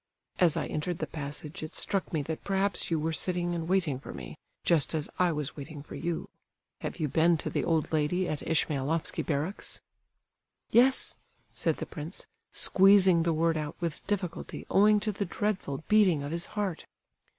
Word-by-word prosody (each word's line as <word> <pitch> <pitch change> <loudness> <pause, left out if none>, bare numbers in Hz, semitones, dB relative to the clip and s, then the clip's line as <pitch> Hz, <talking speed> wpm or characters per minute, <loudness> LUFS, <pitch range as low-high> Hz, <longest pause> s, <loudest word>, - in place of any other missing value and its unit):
"As 170 -3 +4
I - - 0
entered 160 +3 -2
the - - -2
passage 150 +1 -6
it 155 - -7
struck 195 -2 -1
me 155 -3 0
that 160 +2 -5
perhaps 195 0 0
you 165 -2 +1
were 160 +2 -1
sitting 175 +2 0
and 165 -1 -3
waiting 175 -8 +1
for - - -9
me, 65 -2 -8 0.3
just 165 -1 +2
as 155 -2 -2
I 180 -1 +4
was 150 -2 -3
waiting 145 0 -8
for - - -11
you. 170 -1 -3 0.5
Have - - -5
you 155 - +1
been 165 +4 +3
to - - -3
the - - 0
old 160 -1 0
lady 160 +4 +1
at 150 - -2
Ismailofsky 155 0 +1
barracks?" 155 +6 -2 0.9
"Yes," 255 +3 +5 0.4
said - - 0
the - - -4
prince, - - -6 0.3
squeezing 190 -3 +6
the 165 0 +1
word 165 0 +2
out 150 0 -4
with 170 -2 -3
difficulty 185 -4 -3
owing 210 +1 +6
to 215 - 0
the 200 0 -2
dreadful 185 -7 -2
beating 190 -9 +4
of 145 - -4
his 170 +1 0
heart. 200 -5 -2
165 Hz, 180 wpm, -29 LUFS, 150-185 Hz, 0.9 s, squeezing